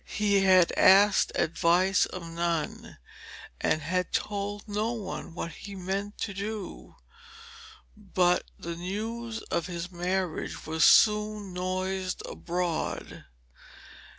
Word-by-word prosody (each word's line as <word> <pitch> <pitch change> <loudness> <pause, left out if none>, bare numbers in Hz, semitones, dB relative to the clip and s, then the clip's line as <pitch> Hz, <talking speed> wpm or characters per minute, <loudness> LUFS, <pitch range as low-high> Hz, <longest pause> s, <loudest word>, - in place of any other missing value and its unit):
He 205 -2 +3
had 185 -2 +6
asked 195 +1 +6
advice 175 +3 +2
of 185 - -7
none, 165 -2 -3 0.6
and 155 - 0
had 180 +1 -1
told 205 0 -3
no 215 +3 -1
one 195 -6 -6
what 170 - -4
he 200 +6 -9
meant 195 +2 -4
to 200 - -2
do, 200 0 -6 1.0
but 185 -4 +1
the 170 0 -6
news 220 +6 -4
of 170 - 0
his 175 0 -5
marriage 180 -1 -3
was 160 0 0
soon 210 -2 +4
noised 185 +1 -2
abroad. 175 -2 -3
185 Hz, 110 wpm, -28 LUFS, 175-205 Hz, 1.0 s, had